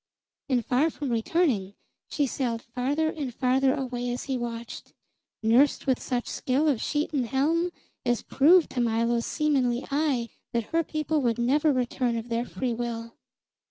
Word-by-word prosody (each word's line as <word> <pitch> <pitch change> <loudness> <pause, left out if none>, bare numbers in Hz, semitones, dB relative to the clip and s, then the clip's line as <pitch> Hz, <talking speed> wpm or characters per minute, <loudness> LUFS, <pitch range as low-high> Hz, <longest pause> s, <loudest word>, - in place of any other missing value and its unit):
And 245 -4 +1
far 270 +5 +2
from 290 -4 -4
returning, 225 - +1 0.3
she 290 - +1
sailed 240 -3 -2
farther 275 +7 -1
and 285 -5 -4
farther 260 +2 +2
away 245 -3 -3
as 245 +1 -3
he 270 - -2
watched, 235 -1 -6 0.5
nursed 245 +6 +4
with 260 -2 +1
such 245 -2 -2
skill 270 +5 0
of 270 -7 +1
sheet 300 +1 -1
and 260 -5 0
helm 315 +7 +1 0.3
as 240 -1 0
proved 330 +5 +4
to 245 - -1
Milo's 235 0 +1
seamanly 265 -5 +1
eye 275 -5 +1 0.2
that 235 -2 -2
her 330 0 +3
people 305 0 -1
would 235 -3 +1
never 285 +6 +3
return 250 -2 0
of 230 +1 -6
their 235 +1 -1
free 250 -1 -3
will. 230 -1 -4
255 Hz, 160 wpm, -27 LUFS, 235-290 Hz, 0.5 s, nursed